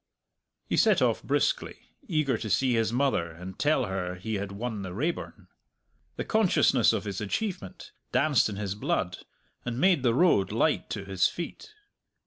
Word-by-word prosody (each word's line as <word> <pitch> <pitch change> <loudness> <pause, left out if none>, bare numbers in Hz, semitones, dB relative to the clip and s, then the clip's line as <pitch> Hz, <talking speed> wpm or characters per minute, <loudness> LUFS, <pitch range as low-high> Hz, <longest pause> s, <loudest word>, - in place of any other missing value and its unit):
He - - -1
set - - +4
off - - +2
briskly, - - 0 0.3
eager 155 - +1
to 110 0 -4
see 130 +3 +2
his 115 -1 +1
mother 125 -9 +1
and 90 +3 -10
tell 145 -3 +2
her 95 -2 -3
he 110 +5 -5
had 100 -1 -3
won 110 +1 -4
the 95 -2 -6
Raeburn. 155 +10 -3 0.7
The - - -4
consciousness 220 -5 +3
of - - -1
his 100 -2 -4
achievement 105 - -4 0.2
danced 140 -6 +3
in 105 - -5
his 100 -1 -3
blood, 95 -2 -2 0.4
and 120 0 -3
made 180 -3 +4
the 120 -3 +2
road 135 - +3
light - - +1
to 100 - -4
his 95 -2 +2
feet. 175 - -7
110 Hz, 165 wpm, -28 LUFS, 95-140 Hz, 0.7 s, set